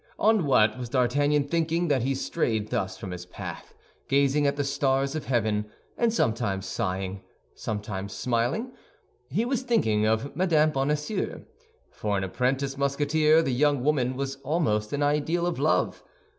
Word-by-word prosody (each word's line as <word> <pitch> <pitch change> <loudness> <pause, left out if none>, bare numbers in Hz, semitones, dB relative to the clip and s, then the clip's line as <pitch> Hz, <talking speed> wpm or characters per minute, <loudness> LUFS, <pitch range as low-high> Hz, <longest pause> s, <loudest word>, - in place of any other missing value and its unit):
On 215 -7 +3
what 110 -3 +4
was 125 -2 -5
D'Artagnan 140 +3 +2
thinking, 165 +2 0
that 135 -4 +2
he 135 +3 0
strayed 110 -7 -1
thus 95 0 -2
from 95 -2 -7
his 90 0 -7
path, - - -8 0.3
gazing 140 +1 +3
at 140 - +1
the 145 - -1
stars 135 0 +1
of 155 - -4
heaven, 110 -4 0 0.3
and 235 -1 +2
sometimes 110 - 0
sighing, 95 -2 -3 0.3
sometimes 105 -2 -4
smiling? 125 - -1 0.6
He 210 - 0
was 255 0 0
thinking 110 - +2
of 110 +6 0
Mme. 160 -4 +3
Bonacieux. 150 +8 -2 0.5
For 105 -2 -2
an 95 - -1
apprentice 135 +7 -1
Musketeer 150 +3 +3
the 135 - -1
young 145 0 +2
woman 130 -3 +1
was 135 0 -3
almost 130 -8 0
an 145 0 0
ideal 150 +4 +1
of 175 -5 -2
love. 155 +3 +1
135 Hz, 155 wpm, -26 LUFS, 110-150 Hz, 0.6 s, what